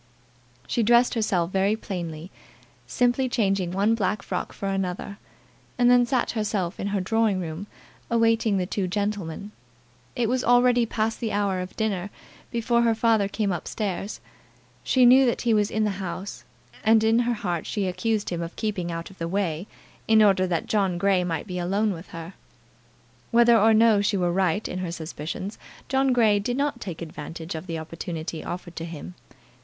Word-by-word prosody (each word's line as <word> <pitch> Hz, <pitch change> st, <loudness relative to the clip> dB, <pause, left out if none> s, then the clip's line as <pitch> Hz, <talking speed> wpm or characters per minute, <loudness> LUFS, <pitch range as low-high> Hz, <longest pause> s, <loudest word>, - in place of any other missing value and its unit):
She 235 Hz, -, 0 dB
dressed 240 Hz, +2 st, +4 dB
herself 190 Hz, -6 st, 0 dB
very 195 Hz, +2 st, +2 dB
plainly, 175 Hz, -5 st, -6 dB, 0.6 s
simply 245 Hz, +1 st, +1 dB
changing 195 Hz, -6 st, +1 dB
one 200 Hz, +5 st, +2 dB
black 205 Hz, -2 st, -1 dB
frock -, -, -3 dB
for 200 Hz, -, -5 dB
another, 195 Hz, +1 st, -3 dB, 0.6 s
and 245 Hz, 0 st, +5 dB
then 245 Hz, -1 st, +5 dB
sat 255 Hz, -2 st, 0 dB
herself 205 Hz, -5 st, -2 dB
in 200 Hz, -, -2 dB
her 200 Hz, 0 st, 0 dB
drawing 215 Hz, +1 st, +1 dB
room 170 Hz, +3 st, -5 dB, 0.4 s
awaiting 230 Hz, -2 st, +2 dB
the 185 Hz, -, 0 dB
two 190 Hz, 0 st, -2 dB
gentlemen. 200 Hz, -1 st, -3 dB, 0.6 s
It 240 Hz, -3 st, +1 dB
was 250 Hz, +2 st, 0 dB
already 245 Hz, 0 st, +4 dB
past 220 Hz, 0 st, -1 dB
the 225 Hz, -2 st, -2 dB
hour 200 Hz, -2 st, 0 dB
of 180 Hz, 0 st, -6 dB
dinner 205 Hz, -4 st, -1 dB, 0.4 s
before 235 Hz, 0 st, +1 dB
her 230 Hz, -1 st, +3 dB
father 220 Hz, -3 st, +2 dB
came 200 Hz, 0 st, -1 dB
up 175 Hz, -, -4 dB
stairs. 200 Hz, -1 st, -3 dB, 0.6 s
She 255 Hz, -2 st, +4 dB
knew 260 Hz, +2 st, +7 dB
that 240 Hz, -, 0 dB
he 235 Hz, -2 st, +3 dB
was 210 Hz, -1 st, +2 dB
in 220 Hz, -, 0 dB
the 210 Hz, -, +1 dB
house, 185 Hz, +2 st, -6 dB, 0.4 s
and 220 Hz, 0 st, +5 dB
in 225 Hz, +1 st, +4 dB
her 240 Hz, 0 st, +1 dB
heart 175 Hz, -5 st, -3 dB
she 205 Hz, -3 st, -1 dB
accused 205 Hz, +3 st, -1 dB
him 170 Hz, -1 st, -2 dB
of 170 Hz, 0 st, -6 dB
keeping 195 Hz, -5 st, -2 dB
out 165 Hz, +2 st, -5 dB
of 195 Hz, -, -18 dB
the 165 Hz, -, -2 dB
way, 180 Hz, -1 st, -2 dB, 0.4 s
in 220 Hz, -1 st, +6 dB
order 190 Hz, -2 st, +4 dB
that 170 Hz, -3 st, -1 dB
John 195 Hz, -4 st, +1 dB
Grey 190 Hz, 0 st, +2 dB
might 165 Hz, -3 st, -2 dB
be 180 Hz, -2 st, -4 dB
alone 200 Hz, +4 st, 0 dB
with 170 Hz, +1 st, -9 dB
her. 165 Hz, +2 st, -8 dB, 1.0 s
Whether 235 Hz, 0 st, +5 dB
or 220 Hz, 0 st, +5 dB
no 220 Hz, -1 st, +5 dB
she 205 Hz, 0 st, +1 dB
were 175 Hz, -2 st, +1 dB
right 190 Hz, +2 st, +1 dB
in 185 Hz, -, -4 dB
her 180 Hz, -2 st, -3 dB
suspicions 165 Hz, +4 st, -6 dB, 0.3 s
John 270 Hz, 0 st, +2 dB
Grey 220 Hz, -4 st, +4 dB
did 245 Hz, +5 st, -2 dB
not 280 Hz, -3 st, -1 dB
take 175 Hz, -3 st, -6 dB
advantage 160 Hz, +1 st, -7 dB
of 160 Hz, +3 st, -7 dB
the 165 Hz, -2 st, -3 dB
opportunity 160 Hz, 0 st, -5 dB
offered 175 Hz, -1 st, -6 dB
to 165 Hz, -, -4 dB
him. 150 Hz, -, -8 dB
200 Hz, 180 wpm, -25 LUFS, 180-225 Hz, 1.0 s, knew